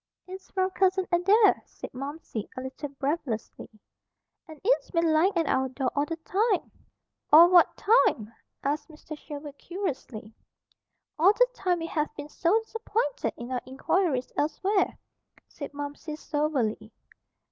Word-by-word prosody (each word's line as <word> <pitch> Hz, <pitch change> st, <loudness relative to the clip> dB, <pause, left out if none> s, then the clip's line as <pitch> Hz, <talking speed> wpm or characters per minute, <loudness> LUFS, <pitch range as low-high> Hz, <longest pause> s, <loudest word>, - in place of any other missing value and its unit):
"It's 375 Hz, +1 st, -10 dB
from 375 Hz, 0 st, 0 dB
Cousin 380 Hz, 0 st, +2 dB
Adair," 395 Hz, +5 st, +4 dB
said -, -, -10 dB
Momsey, 275 Hz, -4 st, -6 dB
a -, -, -3 dB
little 265 Hz, +3 st, -6 dB
breathlessly. 275 Hz, -4 st, -4 dB, 0.8 s
"And 315 Hz, -2 st, -12 dB
it's -, -, +2 dB
been 335 Hz, -2 st, +2 dB
lying 355 Hz, +5 st, +3 dB
at 330 Hz, -, +2 dB
our 265 Hz, -1 st, +1 dB
door 260 Hz, 0 st, -2 dB
all 290 Hz, +1 st, +1 dB
the 330 Hz, -, -3 dB
time." 395 Hz, +5 st, 0 dB, 0.6 s
"All 335 Hz, +4 st, +9 dB
what 355 Hz, -2 st, +5 dB
time?" 235 Hz, -, +3 dB, 0.3 s
asked 290 Hz, +4 st, -2 dB
Mr. 310 Hz, 0 st, -9 dB
Sherwood 290 Hz, -1 st, -9 dB
curiously. 275 Hz, -, -5 dB, 0.9 s
"All 375 Hz, +6 st, +6 dB
the -, -, +4 dB
time 365 Hz, -6 st, 0 dB
we 330 Hz, -, -4 dB
have 305 Hz, -2 st, -1 dB
been 290 Hz, 0 st, -7 dB
so 350 Hz, +8 st, +2 dB
disappointed 445 Hz, -, -2 dB
in 240 Hz, +2 st, -7 dB
our 250 Hz, -1 st, -1 dB
inquiries 270 Hz, 0 st, 0 dB
elsewhere," 385 Hz, +7 st, 0 dB, 0.5 s
said 285 Hz, -, -8 dB
Momsey 290 Hz, +2 st, -6 dB
soberly. 280 Hz, -9 st, -2 dB
310 Hz, 140 wpm, -27 LUFS, 275-370 Hz, 0.9 s, All